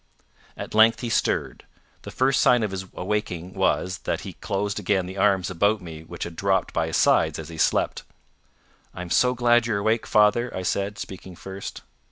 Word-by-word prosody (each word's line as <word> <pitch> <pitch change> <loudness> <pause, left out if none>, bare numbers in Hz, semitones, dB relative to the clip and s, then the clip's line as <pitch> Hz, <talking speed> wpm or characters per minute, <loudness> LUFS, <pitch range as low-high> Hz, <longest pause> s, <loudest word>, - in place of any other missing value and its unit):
At - - -7
length 110 +1 +5
he 120 - -3
stirred. - - -1 0.4
The - - -9
first 130 0 +2
sign 125 -2 +4
of 105 - -2
his 95 0 -5
awaking 90 -2 -3
was, 90 -1 0
that - - -3
he - - -8
closed 100 +1 -3
again 95 -1 0
the 95 +2 -8
arms 95 -3 +2
about 100 +4 +2
me 80 -4 -9
which 85 +1 -7
had 85 -1 -7
dropped 95 +1 0
by - - 0
his - - -1
sides - - +3
as 80 0 -7
he 80 - -9
slept. - - +1 0.9
"I'm 90 -1 -7
so 125 0 +3
glad 120 -1 +3
you're 110 -3 0
awake, 110 +3 0
father," 110 +3 +3
I 95 - -3
said, 100 +2 -1
speaking 95 -1 -8
first. 95 +3 -8
100 Hz, 190 wpm, -24 LUFS, 90-110 Hz, 0.9 s, length